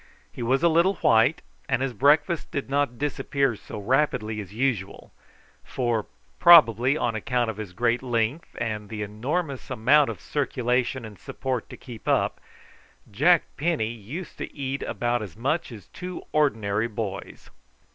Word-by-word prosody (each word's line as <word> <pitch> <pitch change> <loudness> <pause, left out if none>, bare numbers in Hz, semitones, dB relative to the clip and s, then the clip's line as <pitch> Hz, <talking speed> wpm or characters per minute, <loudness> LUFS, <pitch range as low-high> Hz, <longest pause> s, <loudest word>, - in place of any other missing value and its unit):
He - - -9
was 130 +6 +1
a - - +6
little 170 +4 +3
white, 115 +7 +3 0.3
and 130 -1 +1
his 135 -2 -2
breakfast 150 +6 +2
did 140 -2 -4
not 140 -4 0
disappear 140 -2 0
so 105 - -9
rapidly 110 -2 0
as 100 -2 -10
usual, 110 -4 -2 0.5
for, 120 -4 -1 0.3
probably 140 - +7
on 120 - 0
account 120 +2 -1
of 105 - -13
his 105 -4 -6
great 120 +5 0
length, 120 +4 -2
and 105 -3 -3
the 105 -1 -4
enormous 135 - -3
amount 130 +4 +4
of - - -6
circulation 125 -3 -1
and 105 -2 -11
support 130 -4 -4
to - - -10
keep 120 -4 -11
up, - - +1 0.7
Jack 155 - +4
Penny 150 -7 0
used 125 - -8
to - - -5
eat 140 -1 -3
about 120 0 -1
as 100 -4 -8
much 140 +6 -1
as 105 -6 -10
two 180 0 -7
ordinary 110 -8 +1
boys. 105 -3 -6
125 Hz, 155 wpm, -25 LUFS, 110-145 Hz, 0.7 s, probably